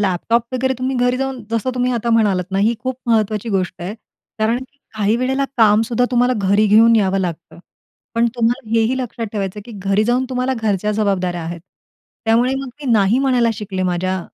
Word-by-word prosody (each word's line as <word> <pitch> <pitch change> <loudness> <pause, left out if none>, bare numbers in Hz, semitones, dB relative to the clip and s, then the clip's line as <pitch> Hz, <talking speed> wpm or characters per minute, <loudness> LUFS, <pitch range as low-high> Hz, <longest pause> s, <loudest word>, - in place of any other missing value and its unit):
Laptop 205 +4 +1
वगैरे 260 +1 0
तुम्ही 260 0 -1
घरी 245 +1 +2
जाऊन 265 -2 -3
जसं 230 +3 -1
तुम्ही 250 0 0
आता 235 0 -1
म्हणालात 205 -5 +2
ना, 195 - -1
ही 220 +4 +2
खूप 255 0 -3
महत्त्वाची 220 -1 +1
गोष्ट 185 -1 -1
आहे. 195 +5 -4 0.4
कारण 220 +3 +1
की 260 +2 -13 0.2
काही 215 +1 +1
वेळेला 265 +2 0
कामसुद्धा 225 +2 +3
तुम्हाला 245 +1 +3
घरी 200 +2 +2
घेऊन 225 +3 +6
यावं 195 -2 +2
लागतं. 170 -2 -5 0.6
पण 230 +1 +3
तुम्हाला 240 0 0
हेही 230 +3 +2
लक्षात 235 -2 -4
ठेवायचं 200 -1 -3
आहे, 210 +4 -10
की 205 - -9
घरी 205 +2 +3
जाऊन 245 +2 +1
तुम्हाला 255 +1 -1
घरच्या 210 -1 0
जबाबदाऱ्या 185 -5 -1
आहेत. 170 +1 -6 0.6
त्यामुळे 240 +4 +2
मग 270 -1 -4
मी 260 - -1
नाही 215 +2 +3
म्हणायला 250 -4 +2
शिकले 195 -3 -4
माझ्या 185 +1 -1
225 Hz, 190 wpm, -19 LUFS, 200-245 Hz, 0.6 s, घेऊन